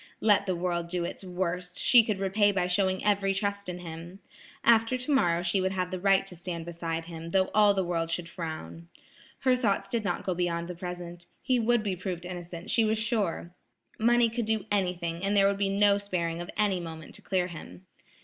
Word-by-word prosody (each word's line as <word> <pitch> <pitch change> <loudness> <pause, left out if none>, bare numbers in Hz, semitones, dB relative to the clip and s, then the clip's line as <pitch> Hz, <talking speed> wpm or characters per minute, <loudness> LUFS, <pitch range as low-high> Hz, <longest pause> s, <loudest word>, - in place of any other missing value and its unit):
Let 205 -2 +4
the 185 - 0
world 170 -1 -2
do 175 0 -2
its 170 - -5
worst, 180 -1 -3
she 245 -2 +6
could 215 -3 -1
repay 200 +2 +2
by 185 -3 0
showing 185 +1 +1
every 195 -1 +2
trust 200 -1 -2
in 180 - -4
him. 170 +1 -8 0.5
After 230 +2 +4
tomorrow 245 - +1
she 185 +2 +1
would 190 +1 0
have 185 -1 -2
the 185 - -3
right 195 +1 +3
to 185 - -9
stand 170 -1 -5
beside 165 -1 -4
him, 165 -1 -8
though 190 +1 +1
all 210 -1 +5
the 190 - +1
world 165 -2 -1
should 170 0 -2
frown. 155 - -7 0.5
Her 260 -1 +4
thoughts 220 -6 0
did 230 -2 -2
not 180 -4 -2
go 185 - -1
beyond 170 -1 -1
the 180 - -5
present. 175 0 -7 0.2
He 255 -2 +2
would 235 0 +2
be 200 -3 -1
proved 180 -1 -5
innocent, 175 -1 -6
she 230 - +4
was 220 0 +1
sure. 210 -6 -1 0.5
Money 235 +1 +4
could 235 0 -2
do 220 -2 0
anything 180 -3 -1
and 200 +1 +1
there 195 0 +6
would 200 0 0
be 200 -1 +1
no 200 0 +4
sparing 175 -4 -2
of 175 - -7
any 205 -4 +2
moment 160 -2 -8
to - - -7
clear 185 -2 0
him. 95 - -10
185 Hz, 210 wpm, -28 LUFS, 170-205 Hz, 0.5 s, she